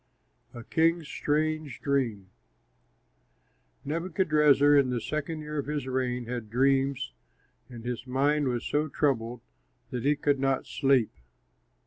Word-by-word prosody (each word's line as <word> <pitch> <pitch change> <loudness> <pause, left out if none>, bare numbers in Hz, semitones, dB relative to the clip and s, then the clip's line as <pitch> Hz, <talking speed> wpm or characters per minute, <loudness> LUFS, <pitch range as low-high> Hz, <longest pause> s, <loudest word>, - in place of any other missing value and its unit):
A 120 - -8
KING'S 165 +3 +1
STRANGE 155 -3 -1
DREAM 120 -9 -1 1.5
Nebuchadrezzar 150 -3 +3
in 140 -3 +4
the 125 -1 -1
second 155 +5 -4
year 150 0 -4
of 140 - -4
his 145 -3 -2
reign 125 -2 -1
had 120 -2 -5
dreams, 135 - +1 0.6
and 120 -2 -10
his 120 0 -4
mind 140 +3 +1
was 120 -2 -2
so 150 +1 0
troubled 125 -5 -1 0.5
that 125 - -3
he 145 +2 +3
could 145 -1 +1
not 135 0 0
sleep. 135 -5 +2
140 Hz, 125 wpm, -28 LUFS, 125-150 Hz, 1.5 s, in